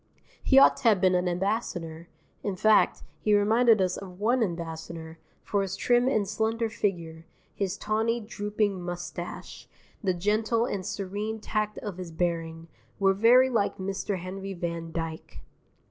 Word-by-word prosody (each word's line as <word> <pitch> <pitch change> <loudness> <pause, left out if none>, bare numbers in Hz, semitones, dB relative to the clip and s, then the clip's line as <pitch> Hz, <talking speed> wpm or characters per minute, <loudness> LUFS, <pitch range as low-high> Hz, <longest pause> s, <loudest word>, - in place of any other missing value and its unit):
He 270 - +3
ought 270 - +7
to - - -12
have 215 -4 +5
been 185 0 +3
an 180 0 +1
ambassador 175 -3 -2 0.3
(in 200 -2 -2
fact, 215 +3 +3 0.2
he 210 -1 +3
reminded 220 +2 +4
us 185 -1 +1
of 185 -2 -10
one 240 +4 +2
ambassador, 165 -3 -5 0.2
for 200 - 0
his 195 -1 -3
trim 245 0 +2
and 215 -7 +1
slender 225 +2 -1
figure, 170 -7 -3 0.3
his 195 -2 -2
tawny, 220 +2 0
drooping 210 -3 -2
moustache, 175 0 -7 0.4
the 185 -2 +1
gentle 215 +5 +1
and 200 -6 -3
serene 205 +3 -4
tact 215 0 -2
of 205 -4 -6
his 180 -2 -6
bearing, 165 -1 -2 0.3
were 195 -1 +3
very 245 +6 +5
like 220 -4 0
Mr. 195 +1 -3
Henry 190 +2 -6
van 170 -1 -4
Dyke). 165 -1 -6
195 Hz, 150 wpm, -27 LUFS, 175-220 Hz, 0.4 s, ought